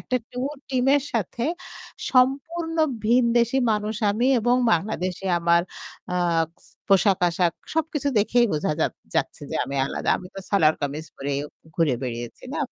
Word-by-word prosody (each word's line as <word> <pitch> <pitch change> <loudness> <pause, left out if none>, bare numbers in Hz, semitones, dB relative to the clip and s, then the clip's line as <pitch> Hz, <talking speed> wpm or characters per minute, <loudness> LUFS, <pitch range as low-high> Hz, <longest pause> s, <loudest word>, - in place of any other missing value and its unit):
একটা 255 - -1
ট্যুর 265 +4 -3
টিমের 270 +1 +3
সাথে 230 +2 -1 0.7
সম্পূর্ন 285 +6 +2 0.3
ভীনদেশি 235 +2 +3
মানুষ 210 +1 -2
আমি, 225 +5 +1
এবং 245 +2 +3 0.2
বাংলাদেশে 185 +1 -1
আমার 170 0 +4 0.5
আ - - 0 0.5
স - - -17 0.2
পোশাক-আসাক 180 -3 +3 0.2
সব 320 -1 +2
কিছু 285 -1 0
দেখেই 235 +3 +3
বুঝা 155 0 0
যা - - +4 0.3
যাচ্ছে - - -1
যে, - - -4
আমি 140 +2 -5
আলাদা। - - -4
আমি 180 - -9
তো 195 - -6
সালওয়ার-কামিজ 155 -5 +1
পরে 140 +1 -4 0.5
ঘুরে 160 -6 +3
বেড়িয়েছি 120 -2 -5
না। - - -2
210 Hz, 140 wpm, -24 LUFS, 170-250 Hz, 0.7 s, আমার